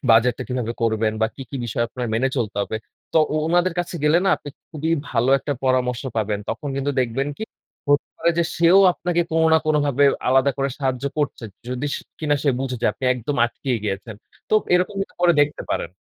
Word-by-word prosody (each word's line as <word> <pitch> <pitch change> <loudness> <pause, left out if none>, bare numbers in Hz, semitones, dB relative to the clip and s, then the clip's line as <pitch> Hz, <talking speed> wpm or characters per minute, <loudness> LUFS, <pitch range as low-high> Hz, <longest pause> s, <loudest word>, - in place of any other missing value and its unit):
বাজেটটা 115 +2 +4
কিভাবে 125 -2 -2
করবেন 110 -1 +1
বা 110 - +4
কি, 135 - -7
কি 140 - -4
বিষয়ে 120 +1 -1
আপনার 125 +1 -4
মেনে 130 +4 +2
চলতে 110 -5 -2
হবে? 110 - -3 0.4
তো - - +4 0.2
ও - - +1
ওনাদের 175 +1 +2
কাছে 175 0 -2
গেলে 150 +3 +5
না - - +3
আপনি 145 - -10 0.2
খুবই 160 0 -3 0.2
ভালো 120 +3 +2
একটা 145 - -3
পরামর্শ 125 -1 +1
পাবেন। 105 -1 0
তখন 145 - -4
কিন্তু 140 +1 0
দেখবেন 130 +3 -1
কি, 220 - -3 0.4
হতে 145 0 +3
পারে 170 - +2
যে 170 - +3
সেও 170 +3 +6
আপনাকে 175 0 -1
কোনো 160 0 +3
না - - +6
কোনভাবে 145 -2 +2 0.2
আলাদা 135 +2 +4
করে 135 0 +1
সাহায্য 130 -2 -1
করছে। 145 -5 -2 0.2
যদি 125 +3 -3 0.3
কিনা 150 -2 +1
সে 145 - +3
বুঝে 130 -1 -3
যে - - +3
আপনি - - -8
একদম 125 +4 -3
আটকিয়ে 125 +1 -2
গিয়েছেন। 105 +2 -4 0.4
তো - - +4 0.2
এরকম 180 +3 +1
কিন্তু 195 - -4
করে 175 -1 +5
দেখতে 145 0 +1
পারেন। - - -1
135 Hz, 200 wpm, -22 LUFS, 120-155 Hz, 0.4 s, সেও